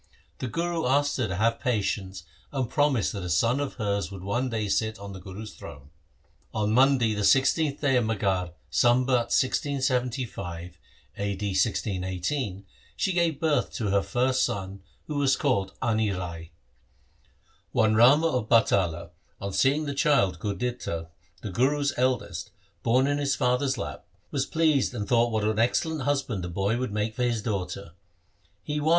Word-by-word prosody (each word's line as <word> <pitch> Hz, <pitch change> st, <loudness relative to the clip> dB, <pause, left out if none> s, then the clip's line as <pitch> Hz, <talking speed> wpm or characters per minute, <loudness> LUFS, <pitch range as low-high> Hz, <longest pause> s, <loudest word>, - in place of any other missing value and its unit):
The 130 Hz, -, -3 dB
Guru 170 Hz, +2 st, -1 dB
asked 145 Hz, +2 st, +2 dB
her 130 Hz, -4 st, 0 dB
to 95 Hz, -, -3 dB
have 115 Hz, +4 st, +1 dB
patience 100 Hz, -5 st, -2 dB, 0.3 s
and 135 Hz, -3 st, -1 dB
promised 145 Hz, -4 st, +1 dB
that 100 Hz, -, -4 dB
a 90 Hz, -, -4 dB
son 115 Hz, -, +2 dB
of 145 Hz, -1 st, -3 dB
hers 100 Hz, -3 st, -1 dB
should 95 Hz, -2 st, -9 dB
one 120 Hz, +7 st, -1 dB
day 110 Hz, -3 st, -2 dB
sit 110 Hz, +3 st, 0 dB
on 100 Hz, 0 st, -8 dB
the 95 Hz, -, -8 dB
Guru's 100 Hz, +3 st, -8 dB
throne. 70 Hz, +1 st, -11 dB, 0.6 s
On 105 Hz, -1 st, +1 dB
Monday 125 Hz, -2 st, +4 dB
the 105 Hz, -, -2 dB
16th 135 Hz, +7 st, +3 dB
day 135 Hz, -3 st, +3 dB
of 120 Hz, -, +2 dB
Maghar, 95 Hz, -5 st, -1 dB, 0.2 s
Sambat 125 Hz, +3 st, +3 dB
1675 125 Hz, -, -1 dB, 0.4 s
(a.d. 100 Hz, 0 st, -2 dB
1618), 95 Hz, +2 st, -1 dB, 0.3 s
she 190 Hz, -, 0 dB
gave 170 Hz, -4 st, +1 dB
birth 155 Hz, -3 st, +1 dB
to 110 Hz, -6 st, -2 dB
her 100 Hz, 0 st, +3 dB
first 130 Hz, +3 st, +1 dB
son 100 Hz, -4 st, -3 dB, 0.2 s
who 150 Hz, -2 st, -3 dB
was 135 Hz, -2 st, +3 dB
called 95 Hz, -1 st, 0 dB
Ani 110 Hz, -2 st, +1 dB
Rai. 85 Hz, -3 st, -5 dB, 1.2 s
One 110 Hz, -1 st, +3 dB
Rama 130 Hz, +8 st, +6 dB
of 125 Hz, -9 st, 0 dB
Batala 90 Hz, -7 st, +2 dB, 0.3 s
on 100 Hz, 0 st, -4 dB
seeing 140 Hz, +7 st, +2 dB
the 140 Hz, -, -3 dB
child 135 Hz, -, +2 dB
Gurditta 100 Hz, -5 st, -3 dB, 0.3 s
the 105 Hz, -, -4 dB
Guru's 140 Hz, +7 st, +1 dB
eldest 130 Hz, 0 st, -1 dB, 0.3 s
born 125 Hz, +3 st, +3 dB
in 145 Hz, +1 st, 0 dB
his 140 Hz, -2 st, +1 dB
father's 125 Hz, +2 st, +1 dB
lap, -, -, -6 dB, 0.2 s
was 135 Hz, -1 st, -1 dB
pleased 155 Hz, -6 st, +2 dB
and 105 Hz, -3 st, -3 dB
thought 120 Hz, -1 st, +3 dB
what 110 Hz, -1 st, 0 dB
an 110 Hz, +1 st, 0 dB
excellent 155 Hz, +6 st, +1 dB
husband 135 Hz, -8 st, -1 dB
the 90 Hz, -, -4 dB
boy 100 Hz, +6 st, 0 dB
would 130 Hz, -4 st, -2 dB
make 105 Hz, +1 st, -1 dB
for 125 Hz, -, -5 dB
his 120 Hz, -3 st, 0 dB
daughter. 100 Hz, -4 st, -3 dB, 0.7 s
He 150 Hz, 0 st, -2 dB
was. 150 Hz, +2 st, 0 dB
115 Hz, 165 wpm, -27 LUFS, 100-135 Hz, 1.2 s, Rama